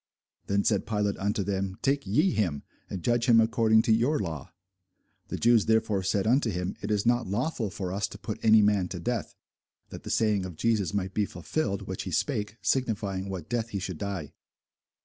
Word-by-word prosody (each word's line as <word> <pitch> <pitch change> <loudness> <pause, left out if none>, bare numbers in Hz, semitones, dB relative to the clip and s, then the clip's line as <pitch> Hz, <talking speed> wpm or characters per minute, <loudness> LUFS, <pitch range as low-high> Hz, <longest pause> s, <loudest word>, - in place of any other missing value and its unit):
Then 100 0 +1
said 105 -4 +1
Pilate 105 -2 -1
unto 100 +1 0
them, 95 -1 -2
Take 140 -5 +1
ye 155 - +3
him, 85 - -1 0.3
and 90 -3 -5
judge 120 +1 +1
him 115 -1 +7
according 110 -1 +4
to - - +1
your 125 +7 +2
law. 80 -7 -5 0.8
The - - -4
Jews 115 -2 +4
therefore 110 -3 +2
said 95 +1 0
unto 125 +2 +3
him, 90 -1 -3
It 105 - -4
is 105 0 +1
not 120 -1 +2
lawful 115 +2 -1
for 95 -1 -4
us 100 +1 -1
to 100 - -10
put 105 +2 -6
any 110 -1 +6
man 105 -3 +2
to 90 - -6
death: 115 +5 -3 0.5
that - - -9
the - - -8
saying 105 -3 +2
of 90 -3 -7
Jesus 110 +1 +1
might 100 -2 -2
be 105 0 +1
fulfilled, 100 -11 -3
which - - -5
he - - -5
spake, 105 +1 -1
signifying 100 -7 -1
what 90 -5 -5
death 115 -1 -2
he 105 - -3
should 95 -4 -5
die. 95 -8 -4
105 Hz, 200 wpm, -28 LUFS, 95-115 Hz, 0.8 s, him